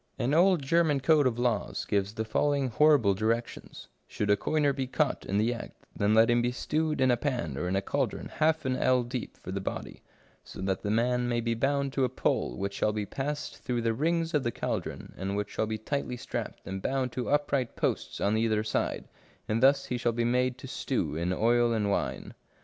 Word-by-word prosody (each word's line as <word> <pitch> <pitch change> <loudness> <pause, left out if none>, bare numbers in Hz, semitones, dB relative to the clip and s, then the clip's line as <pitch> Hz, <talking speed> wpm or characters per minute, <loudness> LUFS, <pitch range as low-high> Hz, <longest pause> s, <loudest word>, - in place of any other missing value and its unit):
An 125 +4 0
old 175 -1 +4
German 155 0 +3
code 145 0 +4
of 120 -2 -1
laws 120 -4 -1
gives 100 +1 -1
the 110 - -2
following 140 +4 +1
horrible 140 -5 +4
directions: 115 +4 -3
" - - -44
Should 105 0 -1
a - - +6
coiner 145 +6 +1
be 135 -1 -3
caught 145 +2 -1
in 100 - 0
the 110 +3 +2
act, 115 - -10
then 105 +1 +2
let 110 +1 +6
him 120 0 +3
be 120 +1 0
stewed 155 +4 -1
in 130 -1 +4
a 120 - +2
pan, 120 - -2
or 90 +6 -2
in 90 - 0
a 95 - 0
caldron - - -2
half 155 0 +1
an 130 -1 +1
ell 130 -1 +2
deep 120 0 -5
for 90 - -8
the 100 +1 -3
body, - - -5 0.4
so - - -11
that 95 0 -1
the 105 - -3
man 120 +3 +1
may 120 -1 +1
be 115 0 0
bound 135 +3 0
to 135 - +1
a 125 - +2
pole - - -1
which 100 0 -3
shall 105 - +1
be 105 -1 -2
passed 145 +6 -4
through 120 -2 -2
the 115 -1 +1
rings 165 +6 0
of 150 - +3
the 120 - -1
caldron, - - -4
and 95 +1 -2
which 105 0 -3
shall 110 - -1
be 110 0 -2
tightly 125 +2 -3
strapped - - -5
and 95 0 -5
bound 130 +1 -1
to 125 0 -3
upright 140 -4 0
posts - - -2
on 100 +2 +1
either 110 -1 +1
side, 110 - -2 0.4
and 110 +1 0
thus 135 +1 +5
he 125 - -3
shall 120 -1 +1
be 115 +1 0
made 125 +1 +1
to 130 - -9
stew 100 - -2
in 85 +3 -1
oil 120 +4 +3
and 105 -2 0
wine." - - -2
120 Hz, 225 wpm, -29 LUFS, 110-140 Hz, 0.4 s, a